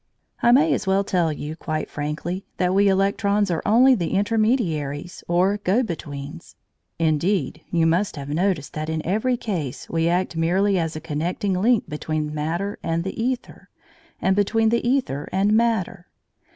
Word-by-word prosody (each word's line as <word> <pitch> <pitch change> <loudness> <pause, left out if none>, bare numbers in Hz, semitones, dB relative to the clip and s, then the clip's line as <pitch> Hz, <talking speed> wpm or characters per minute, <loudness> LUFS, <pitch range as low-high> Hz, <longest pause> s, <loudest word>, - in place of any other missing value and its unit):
I 235 - +5
may 295 +6 +5
as - - -2
well 195 +1 +3
tell 175 -4 +1
you 150 +1 -5
quite 155 -1 -3
frankly 155 +5 -4
that 180 0 +1
we 200 +1 +4
electrons 200 +1 +2
are 165 - -1
only 250 +5 +6
the 180 -8 -1
intermediaries 195 - 0
or 185 +4 +2
go 205 +4 +1
betweens. 150 - -7 0.4
Indeed, 165 0 0
you 165 -1 +2
must 175 +5 +1
have 140 -2 -7
noticed 160 -1 -1
that 155 0 -4
in 160 -1 -3
every 220 +7 +1
case 170 - -4
we 165 0 +1
act 180 0 0
merely 185 +4 +2
as 165 -1 -2
a 155 - -5
connecting 170 +6 -2
link 215 +4 +2
between 150 0 -3
matter 170 +7 -3
and 165 0 -1
the 190 - -4
æther, 245 +2 -4 0.5
and 190 - +2
between 220 +2 +2
the 235 +1 +1
æther 240 - -1
and 195 +3 +2
matter. 220 -6 0
180 Hz, 165 wpm, -23 LUFS, 160-205 Hz, 0.5 s, only